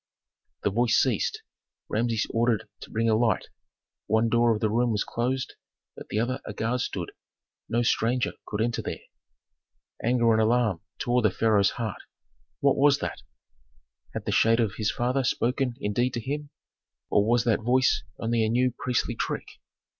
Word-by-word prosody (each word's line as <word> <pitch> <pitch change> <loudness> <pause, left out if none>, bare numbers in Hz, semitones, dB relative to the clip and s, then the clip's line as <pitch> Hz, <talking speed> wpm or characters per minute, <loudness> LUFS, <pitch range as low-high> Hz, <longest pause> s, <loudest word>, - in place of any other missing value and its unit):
The 105 - +1
voice 115 +2 +2
ceased, - - 0 0.4
Rameses 115 0 0
ordered 115 -3 +1
to - - -10
bring 115 +1 0
a 110 - +4
light. 115 0 +1 0.6
One 110 +2 +2
door 120 +1 +4
of 110 - 0
the 110 -1 0
room 120 +2 +2
was 105 -3 0
closed, 125 +2 -2 0.4
at - - -10
the 105 - -1
other 125 +3 -1
a 105 - -6
guard 115 +4 -1
stood. - - -4 0.6
No 120 +1 +1
stranger 120 +1 +1 0.2
could 105 0 -2
enter 120 +1 0
there. - - -5 1.0
Anger 120 -1 +3
and 110 - +3
alarm 110 -6 +2 0.2
tore 125 +1 +1
the 110 - +4
pharaoh's 105 0 +3
heart. 115 -4 -4 0.6
"What 140 -1 +3
was 140 0 +5
that? - - -5 0.9
Had - - -4
the - - -1
shade 115 +1 +4
of 110 -4 +1
his 110 -1 0
father 125 +3 0
spoken 125 +1 0
indeed 120 +3 0
to - - -1
him, 145 +5 -4 0.6
or 100 - +4
was 115 +2 +2
that 115 -3 +2
voice 125 +2 +3 0.2
only 115 0 0
a 110 - +1
new 125 +2 +2
priestly 125 -1 -1
trick?" - - -3
115 Hz, 170 wpm, -26 LUFS, 110-125 Hz, 1.0 s, was